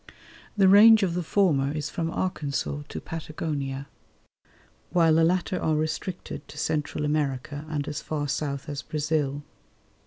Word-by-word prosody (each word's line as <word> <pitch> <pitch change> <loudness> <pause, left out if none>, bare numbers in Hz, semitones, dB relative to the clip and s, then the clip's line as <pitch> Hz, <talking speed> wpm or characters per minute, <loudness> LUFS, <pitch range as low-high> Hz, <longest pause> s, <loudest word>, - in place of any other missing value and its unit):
The 195 -2 +6
range 215 +2 +8
of 180 -3 +1
the 180 - -1
former 155 -6 +2
is 150 -1 -3
from 165 -1 -2
Arkansas 145 -5 -2
to - - -5
Patagonia, 150 -4 -4 1.0
while 165 -2 +4
the 165 +1 +4
latter 180 +2 +1
are 155 - +1
restricted 155 +4 -4
to - - -12
Central 150 0 -1
America 145 0 -2
and 145 -2 -2
as 150 0 -4
far 150 -2 -3
south 140 -1 -3
as 145 -2 -4
Brazil. 150 -2 -1
155 Hz, 145 wpm, -26 LUFS, 145-170 Hz, 1.0 s, range